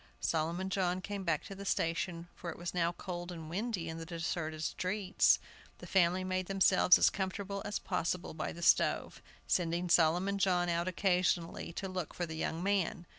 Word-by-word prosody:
Solomon 170 Hz, +4 st, -1 dB
John 185 Hz, -2 st, +1 dB
came 200 Hz, +1 st, -5 dB
back 165 Hz, -4 st, 0 dB
to -, -, -8 dB
the 195 Hz, +1 st, -8 dB
station, 170 Hz, -1 st, -1 dB
for 175 Hz, -, -7 dB
it 165 Hz, -, -6 dB
was 175 Hz, 0 st, -5 dB
now 170 Hz, -1 st, +1 dB
cold 175 Hz, 0 st, -6 dB
and 165 Hz, -2 st, -7 dB
windy 195 Hz, -2 st, -2 dB
in 160 Hz, 0 st, -5 dB
the 165 Hz, -, -6 dB
deserted 165 Hz, -2 st, -3 dB
streets. 190 Hz, +4 st, +2 dB, 0.4 s
The -, -, -10 dB
family 185 Hz, 0 st, +3 dB
made 185 Hz, 0 st, -2 dB
themselves 190 Hz, -2 st, +5 dB
as -, -, +4 dB
comfortable 200 Hz, +1 st, -3 dB
as 205 Hz, -, -2 dB
possible 175 Hz, +1 st, -2 dB
by 155 Hz, -, -3 dB
the 170 Hz, -, -8 dB
stove, -, -, +3 dB, 0.2 s
sending 175 Hz, 0 st, 0 dB
Solomon 175 Hz, +4 st, +3 dB
John 180 Hz, -2 st, +2 dB
out 170 Hz, +1 st, 0 dB
occasionally 180 Hz, -2 st, 0 dB
to 195 Hz, -, -4 dB
look 185 Hz, -4 st, -4 dB
for 175 Hz, -, -2 dB
the 160 Hz, -, -7 dB
young 160 Hz, +1 st, -3 dB
man. 190 Hz, -3 st, 0 dB
180 Hz, 180 wpm, -33 LUFS, 170-190 Hz, 0.4 s, themselves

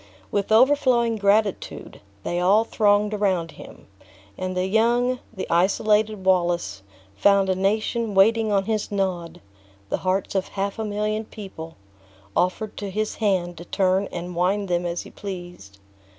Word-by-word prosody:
With 200 Hz, +1 st, -1 dB
overflowing 240 Hz, -1 st, +4 dB
gratitude, 205 Hz, 0 st, 0 dB, 0.2 s
they 175 Hz, -, -2 dB
all 195 Hz, +5 st, +4 dB
thronged 210 Hz, -1 st, +2 dB
around 190 Hz, -6 st, 0 dB
him; -, -, -13 dB, 0.5 s
and 185 Hz, 0 st, -4 dB
the 180 Hz, -, +1 dB
young, 240 Hz, +5 st, +2 dB
the 190 Hz, -5 st, -5 dB
isolated 210 Hz, +3 st, +2 dB
Wallace, 175 Hz, -, +1 dB, 0.3 s
found 195 Hz, -, +3 dB
a 185 Hz, -, +2 dB
nation 215 Hz, +3 st, -1 dB
waiting 220 Hz, +3 st, +4 dB
on 195 Hz, -1 st, +2 dB
his 215 Hz, -1 st, -2 dB
nod; 185 Hz, -4 st, -2 dB, 0.5 s
the -, -, 0 dB
hearts 185 Hz, +1 st, -1 dB
of 190 Hz, -1 st, -1 dB
half 200 Hz, +1 st, -3 dB
a 220 Hz, -, -2 dB
million 210 Hz, +1 st, -1 dB
of 220 Hz, -, -14 dB
people 165 Hz, -6 st, -9 dB, 0.6 s
offered 200 Hz, +4 st, -1 dB
to 205 Hz, -, -4 dB
his 215 Hz, +2 st, -2 dB
hand 185 Hz, -5 st, 0 dB
to 170 Hz, -, -9 dB
turn 190 Hz, +2 st, +1 dB
and 175 Hz, 0 st, -6 dB
wind 190 Hz, +3 st, 0 dB
them 175 Hz, 0 st, 0 dB
as 170 Hz, 0 st, -3 dB
he -, -, -13 dB
pleased. 175 Hz, -, -8 dB
200 Hz, 150 wpm, -23 LUFS, 180-215 Hz, 0.6 s, overflowing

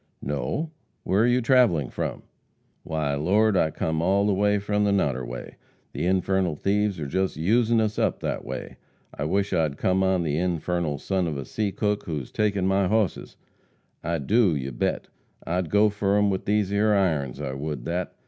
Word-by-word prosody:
"No. 75 Hz, -, -2 dB, 0.3 s
Where 100 Hz, +4 st, +2 dB
are -, -, +3 dB
you 125 Hz, +1 st, +3 dB
travelling 115 Hz, -, +3 dB
from?" -, -, -4 dB, 0.6 s
"Why, 80 Hz, -3 st, -2 dB
Lord, 100 Hz, +9 st, +2 dB
I've 80 Hz, -4 st, +1 dB
come 80 Hz, 0 st, -1 dB
all 100 Hz, +4 st, +2 dB
the 105 Hz, -, +2 dB
way 105 Hz, +1 st, +2 dB
from 105 Hz, +1 st, 0 dB
the 105 Hz, -, +2 dB
Noderway. 65 Hz, -10 st, -2 dB, 0.4 s
The -, -, -2 dB
infernal 95 Hz, -2 st, +1 dB
thieves 100 Hz, +2 st, 0 dB
are 75 Hz, -, -3 dB
just 95 Hz, +5 st, -1 dB
usin' 115 Hz, +7 st, +2 dB
us 110 Hz, -1 st, 0 dB
up -, -, +1 dB
that -, -, -3 dB
way. 65 Hz, 0 st, -7 dB, 0.4 s
I 70 Hz, -, -4 dB
wish 100 Hz, +5 st, 0 dB
I'd 80 Hz, -5 st, 0 dB
come 95 Hz, +1 st, +1 dB
on 95 Hz, -2 st, +2 dB
the 75 Hz, -1 st, -1 dB
infernal 85 Hz, -3 st, -1 dB
son 95 Hz, +4 st, -1 dB
of 75 Hz, -3 st, -3 dB
a 70 Hz, -, -5 dB
seacook 105 Hz, -, -1 dB
whose 75 Hz, -6 st, -4 dB
taken 100 Hz, -3 st, 0 dB
my 95 Hz, 0 st, +2 dB
hosses. 105 Hz, -1 st, -1 dB, 0.7 s
I 85 Hz, +1 st, -1 dB
do, 95 Hz, -, +2 dB
you 70 Hz, -1 st, -3 dB
bet, -, -, -2 dB, 0.4 s
I'd 90 Hz, -1 st, -1 dB
go 105 Hz, +1 st, +4 dB
fur 100 Hz, -1 st, +1 dB
him 105 Hz, -1 st, +3 dB
with 95 Hz, -, -3 dB
these 105 Hz, -1 st, +1 dB
'ere 105 Hz, +1 st, +3 dB
irons. 75 Hz, -9 st, 0 dB
I 70 Hz, -3 st, -4 dB
would 70 Hz, -2 st, -5 dB
that!" 90 Hz, +1 st, -3 dB
95 Hz, 185 wpm, -25 LUFS, 75-105 Hz, 0.7 s, go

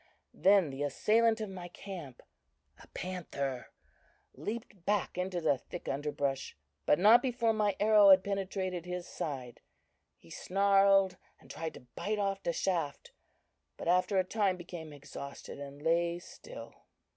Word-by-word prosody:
Then 195 Hz, -6 st, +4 dB
the 135 Hz, +1 st, -6 dB
assailant 220 Hz, -, +2 dB
of 215 Hz, -, -3 dB
my 180 Hz, -2 st, -7 dB
camp 175 Hz, -7 st, -9 dB, 0.6 s
a -, -, -15 dB
panther 140 Hz, -8 st, -4 dB, 0.7 s
leaped 205 Hz, -, -6 dB
back 205 Hz, +1 st, 0 dB
into 180 Hz, 0 st, -2 dB
the 145 Hz, -5 st, +2 dB
thick -, -, -9 dB
underbrush, 140 Hz, -, -2 dB, 0.3 s
but 150 Hz, -, +5 dB
not 215 Hz, +6 st, +7 dB
before 240 Hz, -3 st, +1 dB
my 210 Hz, -2 st, +1 dB
arrow 210 Hz, -1 st, +6 dB
had 190 Hz, -1 st, +8 dB
penetrated 190 Hz, -3 st, -3 dB
his 180 Hz, -1 st, -4 dB
side. 130 Hz, -6 st, -5 dB, 0.6 s
He 85 Hz, -, -19 dB
snarled 195 Hz, -1 st, +3 dB, 0.2 s
and -, -, -13 dB
tried 160 Hz, -1 st, -5 dB
to -, -, -11 dB
bite 215 Hz, +1 st, -2 dB
off 195 Hz, -1 st, -1 dB
the 170 Hz, -, 0 dB
shaft, 165 Hz, -4 st, -2 dB, 0.7 s
but -, -, -6 dB
after 180 Hz, +3 st, +3 dB
a 185 Hz, -, +4 dB
time 195 Hz, -1 st, 0 dB
became 175 Hz, -3 st, -8 dB
exhausted 140 Hz, -1 st, -9 dB
and 140 Hz, +1 st, -9 dB
lay 170 Hz, +1 st, +2 dB
still. 475 Hz, -, -11 dB
180 Hz, 145 wpm, -32 LUFS, 155-200 Hz, 0.7 s, had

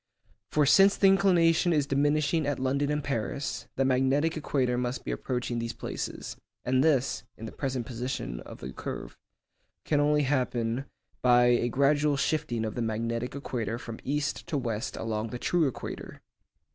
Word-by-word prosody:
For 150 Hz, -1 st, +3 dB
since 195 Hz, +7 st, +6 dB
the -, -, +3 dB
inclination 180 Hz, -3 st, +4 dB
is 150 Hz, -3 st, +2 dB
diminishing 145 Hz, +2 st, +1 dB
at 145 Hz, -, 0 dB
London 140 Hz, +2 st, 0 dB
and 150 Hz, 0 st, -1 dB
Paris, 120 Hz, -2 st, -3 dB
the 135 Hz, -, +1 dB
magnetic 135 Hz, +5 st, +2 dB
equator 135 Hz, -5 st, 0 dB
must 125 Hz, 0 st, -2 dB
be -, -, -2 dB
approaching 125 Hz, -2 st, -2 dB
these 115 Hz, 0 st, -3 dB
places, -, -, -5 dB, 0.3 s
and 130 Hz, +1 st, +3 dB
this 140 Hz, -6 st, +2 dB
(in 115 Hz, -, -7 dB
the 110 Hz, -, -6 dB
present 130 Hz, -4 st, -3 dB
position 120 Hz, -, -4 dB
of -, -, -11 dB
the 65 Hz, +1 st, -6 dB
curve) -, -, -6 dB, 0.7 s
can 150 Hz, -, +2 dB
only 150 Hz, 0 st, +3 dB
happen 125 Hz, -2 st, 0 dB, 0.4 s
by 125 Hz, -1 st, +5 dB
a 120 Hz, 0 st, +3 dB
gradual 145 Hz, +3 st, +2 dB
shifting 140 Hz, -6 st, 0 dB
of 110 Hz, -, -3 dB
the 120 Hz, -, -3 dB
magnetic 115 Hz, +2 st, -2 dB
equator 115 Hz, -5 st, -3 dB
from 115 Hz, -2 st, -8 dB
east 140 Hz, +1 st, -2 dB
to 150 Hz, -, -1 dB
west 115 Hz, -5 st, -3 dB
along 110 Hz, 0 st, -2 dB
the 125 Hz, -, -5 dB
true 165 Hz, +4 st, +2 dB
equator. 130 Hz, -, -6 dB
130 Hz, 165 wpm, -28 LUFS, 120-145 Hz, 0.7 s, since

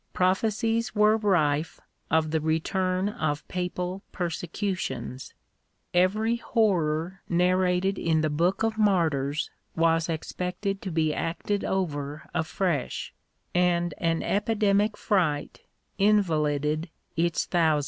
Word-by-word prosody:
Prophecies 220 Hz, +5 st, +1 dB
were 210 Hz, +1 st, +5 dB
rife 165 Hz, -8 st, +1 dB, 0.3 s
of 160 Hz, -1 st, +2 dB
the 160 Hz, -, +2 dB
return 185 Hz, +4 st, 0 dB
of 155 Hz, -9 st, -2 dB
papal 180 Hz, +1 st, -3 dB
persecutions; 170 Hz, -, -4 dB, 0.6 s
every 215 Hz, +6 st, +2 dB
horror 180 Hz, -6 st, 0 dB
narrated 180 Hz, +2 st, +2 dB
in 160 Hz, -1 st, +2 dB
the 155 Hz, -, +1 dB
Book 175 Hz, +8 st, +1 dB
of 225 Hz, -1 st, 0 dB
Martyrs 155 Hz, -8 st, +1 dB, 0.2 s
was 165 Hz, 0 st, +2 dB
expected 180 Hz, +4 st, -3 dB
to 195 Hz, -, -4 dB
be 155 Hz, -2 st, +1 dB
acted 170 Hz, +6 st, -2 dB
over 150 Hz, -5 st, -2 dB
afresh; 170 Hz, -3 st, -1 dB, 0.4 s
and 175 Hz, -2 st, +2 dB
an 165 Hz, -1 st, 0 dB
epidemic 210 Hz, 0 st, +1 dB
fright 165 Hz, -8 st, 0 dB, 0.3 s
invalided 155 Hz, -6 st, +2 dB, 0.3 s
its 170 Hz, 0 st, +1 dB
thousands. 160 Hz, -4 st, +2 dB
175 Hz, 105 wpm, -27 LUFS, 160-195 Hz, 0.6 s, were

